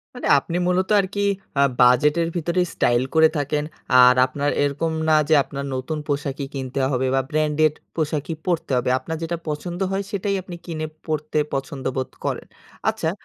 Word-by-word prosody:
মানে 245 - -4
আপনি 170 +5 -4
মূলত 185 +2 +1
আর 195 - +2
কি, 205 - 0 0.4
আ - - +6 0.2
বাজেটের 150 +7 +4
ভেতরেই 175 +2 +1
স্টাইল 120 +1 +2
করে 160 0 +6
থাকেন। 150 +1 -1 0.4
আর 125 0 +7
আপনার 140 +2 -1
এরকম 145 +3 -1 0.2
না, - - +5 0.2
যে - - +5
আপনার 140 0 -6
নতুন 130 +5 -3
পোশাকই 140 -1 -2
কিনতে 135 0 -3
হবে 130 0 0
বা 135 - +3
ব্র্যান্ডেড 155 0 +2 0.2
পোশাকই 155 0 -2
পরতে 170 -5 -1
হবে। 125 - 0
আপনার 160 +3 -5
যেটা 170 +1 -2
পছন্দ 175 +4 -4
হয়, 195 +1 -1
সেটাই 200 0 -1
আপনি 180 -1 -9
কিনে 155 -2 -4 0.2
পড়তে 155 -1 -1
পছন্দবোধ 135 -1 -3 0.2
করেন। - - -3 0.4
আচ্ছা, - - -1
150 Hz, 170 wpm, -22 LUFS, 135-170 Hz, 0.4 s, আর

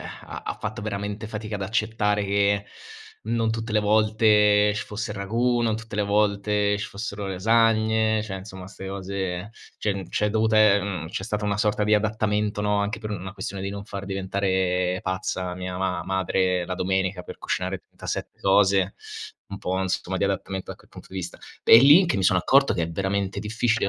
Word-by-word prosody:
ha - - -9
ha - - -4
fatto - - -4
veramente 105 +1 -4
fatica 105 0 -5
ad 100 - -5
accettare 110 -1 0
che 100 0 +1 0.6
non 115 0 0
tutte 110 0 -3
le 105 - +3
volte 105 -1 +4
ci - - -3
fosse 110 +2 -5
il 105 - -5
ragù, 120 +5 +1
non 110 -2 +1
tutte 110 -1 -8
le 105 - +2
volte 105 0 +1
ci 105 - -3
fossero 100 -1 -5
le 95 - -3
lasagne, 110 +1 +3
cioè, 95 -3 -5
insomma, 95 -1 -9
'ste 95 -1 -9
cose 95 0 -4 0.3
c'è 105 - 0
n 95 -2 -6
c'è 105 0 0
dovuta 110 0 +2
ehm, 100 -6 +3
c'è 95 - -4
stata 105 -1 -2
una 100 0 0
sorta 105 -1 +1
di 105 +1 +3
adattamento, 105 -1 0
no, 105 0 +1
anche 100 +2 -2
per 110 -1 -5
una 95 -1 -5
questione 100 -1 -5
di 100 - -3
non 100 0 -6
far 100 -1 -6
diventare 95 -2 0
pazza 95 -1 -2
mia 90 0 -5
ma 95 0 -1
madre 95 -1 0
la 90 - -4
domenica 95 0 -1
per - - -10
cucinare - - -2
37 - - -6
cose 95 -1 +3 0.5
un 100 0 -7
po', 95 - -2
insomma, 95 0 -2
di 100 - +1
adattamento 95 -1 -3
da - - -7
que - - -22
punto - - -13
di - - -11
vista. 90 -2 -5 0.3
È - - +9
lì 145 +10 +8
che 170 - 0
mi 95 - 0
sono 90 0 +4
accorto 135 +9 +4
che 85 - -1
è 85 - -6
veramente 95 +2 -2
difficile, 110 0 0
100 Hz, 195 wpm, -25 LUFS, 95-110 Hz, 0.6 s, È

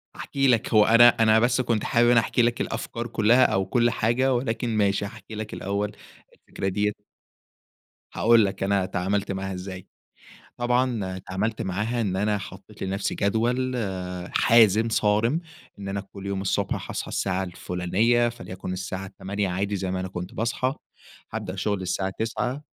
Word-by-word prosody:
هاحكي 135 -1 -1
لك، 115 -4 +2
هو 105 -1 +6
أنا 115 +2 +8
أنا 110 -1 +4
بس 120 +2 +2
كنت 115 -3 0
حابب 120 0 +3
إن 120 - +5
أنا 115 - +6
أحكي 120 +2 +1
لك 120 0 +1
الأفكار 115 +1 -4
كُلّها 120 +3 +4
أو 95 -2 +1
كُلّ 120 -1 +2
حاجة، 125 +4 +1
ولكن 115 -2 -1
ماشي 100 -1 +2
هأحكي 110 +1 -9
لك 110 0 -6
الأول 100 +1 -2 0.4
الفكرة 95 - -6
دِيّة 105 +2 +1 1.2
هاقول 115 -2 +5
لك 95 - -3
أنا 100 -1 +1
تعاملت 95 +3 -1
معاها 95 0 -3
إزَّاي، 90 0 -7 0.7
طبعًا 120 -6 0
تعاملت 100 +5 -3
معاها 105 +6 -1
إن 95 -4 -1
أنا 105 +1 +1
حَطَّيت 100 +2 -10
لنفسي 95 +1 -2
جدول 120 +5 0
آآ 90 -5 -4
حازم، 115 -1 +5
صَارم، 110 +7 +2 0.4
إن 100 - -6
أنا 100 0 -2
كُلّ 100 0 -11
يوم 100 -1 -2
الصُّبح 95 - 0
حاصحى - - -5
السّاعَة 95 -1 -1
الفُلانيَّة، 95 +7 +1
فليكُن 95 -5 -7
السَّاعة 95 +1 -5
08:00 100 0 -2
عادي 100 +3 -1
زي 95 -1 -2
ما 95 - -2
أنا 95 - -3
كُنت 90 0 -6
باصحى، 125 +3 -1 0.6
هأبدأ 100 -4 -4
شُغل 100 0 -1
السَّاعَة 95 +1 -2
09:00 125 +5 -2
105 Hz, 165 wpm, -25 LUFS, 95-115 Hz, 1.2 s, أنا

